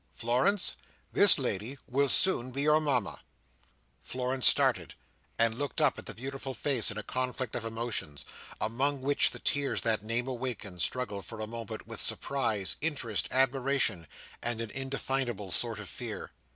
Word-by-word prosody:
Florence, 130 - +1 0.4
this 200 -2 +10
lady 125 0 -3
will 140 +3 0
soon 130 -9 +4
be 135 +3 -2
your 150 +1 +4
Mama." 130 -9 -1 0.8
Florence 130 0 +1
started, - - +3 0.4
and 115 +1 +1
looked 145 -1 -3
up - - +2
at - - -11
the - - -7
beautiful 135 +1 -6
face 130 -2 +2
in 105 - -5
a 105 - -5
conflict 130 -1 -3
of 120 -2 -4
emotions, 115 -10 -4 0.3
among 130 +5 -1
which 140 +1 +2
the - - -7
tears 140 -1 -1
that 110 -3 +1
name 115 +4 -2
awakened, 120 -8 -5
struggled 105 -5 0
for 115 - -10
a 110 - -3
moment 115 0 -8
with - - -4
surprise, 110 -8 -1
interest, 135 -9 -1
admiration, 130 - +1 0.3
and 120 -1 -2
an 115 -2 -5
indefinable 135 -6 -3
sort 115 +2 -2
of 105 - -8
fear. - - -7
125 Hz, 155 wpm, -29 LUFS, 110-135 Hz, 0.8 s, this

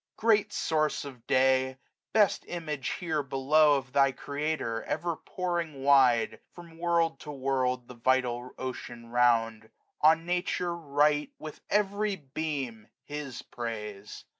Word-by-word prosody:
65 - - -51
Great 215 -2 +3
source 155 -2 0
of 125 -4 -11
day! 130 0 +3 0.3
best 210 -3 +3
image 150 -5 -4
here 160 -4 -1
below 145 +3 +4
Of 130 -2 -7
thy 135 -1 +4
Creator, 140 -4 -3
ever 170 -1 -1
pouring 170 -6 -3
wide. 130 -5 +4 0.2
Prom 170 -2 -13
world 170 -1 +1
to 150 - -8
world, 130 -2 -1
the - - -10
vital 125 0 0
ocean 120 -2 -7
round; 115 -2 +2 0.3
On 160 +2 +5
Nature 175 0 -1
write 150 -2 +1
with 155 -1 -9
every 205 0 +1
beam 135 - -4 0.2
His 145 -4 -6
praise. 105 -4 -6
140 Hz, 130 wpm, -29 LUFS, 125-165 Hz, 0.3 s, On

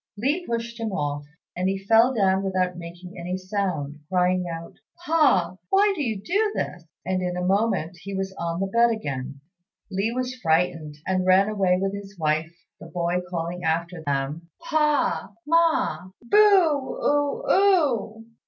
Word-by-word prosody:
Li 285 - 0
pushed 235 0 -3
him 225 -2 -2
off, 145 -5 -3 0.3
and 185 +1 0
he 195 - -1
fell 225 +6 +4
down 195 -5 +2
without 185 -2 0
making 175 +2 -10
any 180 +2 -3
sound, 185 -7 -3
crying 180 0 +2
out, 165 0 -7 0.3
"Pa! 195 - +3
why 400 +1 +4
do 315 - -3
you 225 -7 -1
do 410 - 0
this?" 175 -2 -4 0.2
and 185 0 0
in 180 -1 -2
a 180 - -2
moment 190 -3 0
he 200 0 -6
was 190 0 -3
on 170 -2 -3
the 195 - 0
bed 235 +4 +3
again. 140 - -4 0.5
Li 195 +4 0
was 255 +1 -2
frightened, 160 -2 +1
and 185 0 0
ran 190 +2 +5
away 190 -4 +2
with 195 +1 -1
his 200 -1 -8
wife, 155 0 0 0.3
the - - -10
boy 175 0 -1
calling 175 0 -4
after 170 +1 -1
them, 145 +3 -2
"Pa! 300 -9 0
Ma! 315 - +2
boo 235 - -1
oo 290 - +2
oo." 280 - +2
190 Hz, 160 wpm, -24 LUFS, 175-235 Hz, 0.5 s, ran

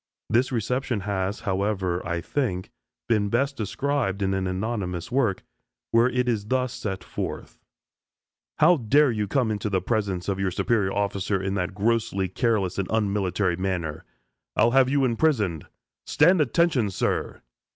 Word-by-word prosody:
This 120 +4 +2
reception 125 -1 -1
has, 100 0 -2
however, 95 -3 -1
I 85 0 -2
think, 95 -4 -2 0.4
been 105 -3 +2
best 140 +6 +1
described 110 -2 -1
in 95 0 +1
an 95 -1 -1
anonymous 95 -2 -3
work, 120 -7 +1 0.5
where 115 +2 +4
it 125 0 0
is 110 -4 -1
thus 130 +1 0
set 95 -3 -4
forth: - - -6 1.0
"How 170 +3 +5
dare 140 +3 +3
you 105 -2 -1
come 115 +2 +1
into 105 0 -2
the 95 -2 +1
presence 100 -5 -2
of 100 -1 -1
your 95 -1 +1
superior 95 +1 0
officer 100 -1 -1
in 95 +1 -2
that 95 -1 -2
grossly 105 -3 0
careless 100 -3 0
and 95 - -1
unmilitary 100 -4 0
manner? 90 -5 -3 0.5
I'll 120 - +4
have 130 0 +4
you 140 -1 +2
imprisoned. 115 - +1 0.4
Stand, 170 +3 +4
attention, 145 -5 +2
sir!" 95 - -2
105 Hz, 150 wpm, -25 LUFS, 95-125 Hz, 1.0 s, How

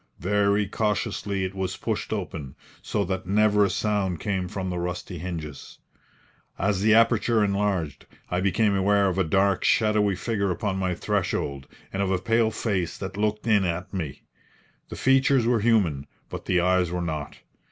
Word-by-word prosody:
Very 100 +2 +2
cautiously 100 -1 -1
it 95 0 -3
was 95 -1 -3
pushed - - -3
open, 70 -3 -4 0.3
so 100 -2 -1
that 95 0 -3
never 105 +1 +4
a 100 - +2
sound 95 -3 -1
came 95 -2 -2
from 95 0 -4
the 90 - -3
rusty 90 0 -4
hinges. 80 -5 -7 0.8
As 100 0 0
the 110 +1 +5
aperture 115 -1 +3
enlarged, 100 -6 -1 0.2
I 90 0 -1
became 100 +2 +2
aware 100 +1 +3
of 95 +1 -2
a - - +4
dark, 95 +2 +2
shadowy 105 -2 +3
figure 100 +1 -1
upon 95 +2 -2
my 95 -2 -1
threshold, 70 -4 -2 0.3
and 95 - -1
of 100 - 0
a 95 - +2
pale 115 +4 +2
face 95 -6 -2
that 95 -1 -6
looked 105 +1 -1
in 105 -4 +4
at 90 +1 -3
me. 80 -8 -5 0.7
The - - -6
features 135 -2 +3
were 120 -1 +3
human, 95 - +2 0.2
but - - -7
the 90 -1 +2
eyes 90 -1 +2
were 90 0 -2
not. 75 -3 -4
95 Hz, 170 wpm, -25 LUFS, 90-105 Hz, 0.8 s, the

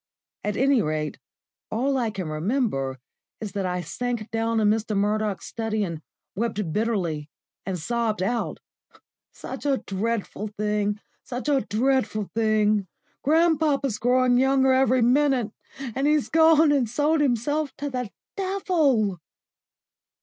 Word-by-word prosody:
At 210 0 -2
any 270 -2 +4
rate, 155 -2 -2 0.5
all 265 +5 0
I 240 -4 +1
can 195 -5 -5
remember 155 - -1 0.4
is 215 -3 -5
that 195 -1 -2
I 180 0 -2
sank 235 +5 -4
down 225 0 0
in 215 - +3
Mr. 215 0 +1
Murdoch's 210 -2 0
study, 220 -2 -2
and 170 -5 -4 0.3
wept 210 -5 -2
bitterly 180 -9 -1 0.4
and 190 -2 -1
sobbed 220 +2 -1
out: 235 +4 -1 0.7
"Such - - -8
a 275 -2 +3
dreadful 210 +1 -2
thing 210 0 0 0.2
such 250 +2 -5
a 280 -2 +3
dreadful 240 -3 0
thing. 215 -2 +2 0.3
Grandpapa's 300 -6 +2
growing 250 +1 +3
younger 265 0 +4
every 260 -1 +3
minute; 255 -3 +3 0.3
and 270 +1 -2
he's 300 -2 +2
gone 320 -1 +5
and 265 -6 +2
sold 295 +5 +2
himself 285 +3 0
to 285 -1 -4
the 250 -4 -3 0.3
Devil!" 320 - +1
230 Hz, 130 wpm, -25 LUFS, 205-270 Hz, 0.7 s, gone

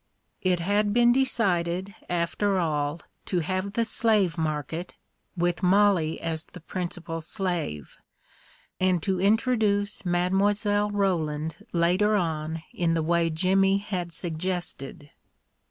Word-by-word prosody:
It 180 -2 +2
had 205 +4 +1
been 240 0 +6
decided, 190 -7 0 0.2
after 180 +3 0
all, 150 -2 -1 0.3
to 180 -2 0
have 185 +4 -2
the 230 +1 +1
slave 210 -6 +2
market, 160 +2 -3 0.4
with 175 +1 0
Mollie 185 -4 +3
as 160 -1 -3
the 180 - -12
principal 170 -1 -5
slave, 165 - -3 0.8
and 185 -3 +2
to 190 -2 0
in 200 +4 +4
troduce 215 -4 0
Mile. 200 +4 +1
Roland 165 -4 -1
later 180 +5 +2
on 160 -3 -2
in 165 -2 +1
the 165 - 0
way 170 +1 +2
Jimmy 195 +4 +3
had 185 -4 -4
suggested. 165 -4 -4
180 Hz, 120 wpm, -26 LUFS, 165-200 Hz, 0.8 s, been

